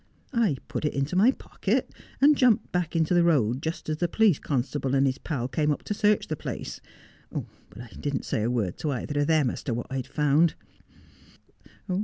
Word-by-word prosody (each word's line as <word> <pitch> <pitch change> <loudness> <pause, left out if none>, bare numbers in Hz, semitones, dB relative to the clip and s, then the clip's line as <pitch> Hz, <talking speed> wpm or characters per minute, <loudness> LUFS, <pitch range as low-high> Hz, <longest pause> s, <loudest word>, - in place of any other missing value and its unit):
I 220 - +2
put - - -4
it 150 - -1
into 140 +5 -1
my 205 +7 +6
pocket, 270 - -1 0.3
and 295 +2 +6
jumped 250 -6 +3
back 180 -2 -1
into 165 +1 +2
the 175 - +5
road 130 -7 +2
just 160 +1 -4
as 155 -1 -1
the 175 - +1
police 205 -2 +3
constable 135 0 -1
and 135 0 +4
his 135 0 0
pal 130 -7 -3
came 150 +2 0
up 145 - -3
to - - -2
search 210 0 +2
the 155 - -2
place; - - -6 0.5
but 95 +4 -8
I 120 -1 -9
didn't 145 -1 -2
say - - -1
a 110 - 0
word 110 -8 -1
to 155 - -2
either 145 +3 -2
of 145 - +1
them 155 -6 +3
as - - -6
to 120 - -1
what 120 - -4
I'd 130 -2 -3
found. 150 +2 +2
150 Hz, 205 wpm, -26 LUFS, 130-175 Hz, 0.5 s, my